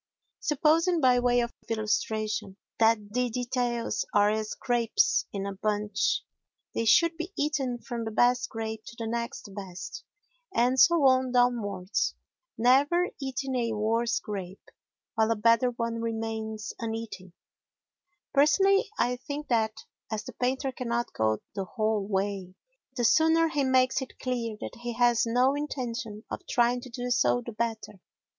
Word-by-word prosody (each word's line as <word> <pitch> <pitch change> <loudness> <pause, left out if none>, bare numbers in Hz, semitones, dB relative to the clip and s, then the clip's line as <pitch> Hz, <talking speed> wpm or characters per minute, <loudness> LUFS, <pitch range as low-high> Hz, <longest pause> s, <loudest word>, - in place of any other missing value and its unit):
Supposing, 325 +4 +2
by 255 -3 +4
way 245 0 +3
of 235 0 -3 0.2
illustration, 215 -2 -1 0.2
that 220 -2 +2
the 250 0 +1
details 245 0 -1
are 205 0 +5
as 215 0 -2
grapes 240 -3 +1
in 200 -1 -4
a 200 - -3
bunch, 210 +1 0 0.5
they 230 - -1
should 335 +9 +5
be 335 +3 -5
eaten 275 -4 0
from 235 -1 -5
the 220 - -3
best 245 +3 +2
grape 220 -1 -5
to - - -10
the 230 - -4
next 235 -3 -4
best, 195 +9 -7 0.5
and 255 -5 +2
so 340 -2 +6
on 260 -1 +4
downwards, 225 -6 +1 0.4
never 285 +9 +4
eating 265 0 -3
a 235 -2 0
worse 225 +2 +1
grape 195 -2 -7 0.4
while 220 0 +2
a 230 - +2
better 230 +3 +4
one 230 -1 -3
remains 220 -1 -4
uneaten. 225 -5 -5 1.0
Personally, 390 +8 +4
I 245 +1 +1
think 285 +3 -6
that, 220 -3 0 0.3
as 220 0 -2
the - - -9
painter 260 +2 -1
cannot 240 -1 -3
go 110 0 0
the 195 -2 -3
whole 215 -1 -1
way, 195 -2 -2 0.4
the 240 - 0
sooner 320 +5 +4
he 295 -3 0
makes 260 0 +3
it 265 - -8
clear 235 -4 -3
that - - -6
he 240 0 -3
has 240 0 +3
no 250 +4 +3
intention 245 -7 -4
of - - -4
trying 245 0 +2
to 255 - -10
do 245 +1 -4
so 245 0 +2
the 235 - -5
better. 220 -3 -4
235 Hz, 150 wpm, -28 LUFS, 220-255 Hz, 1.0 s, so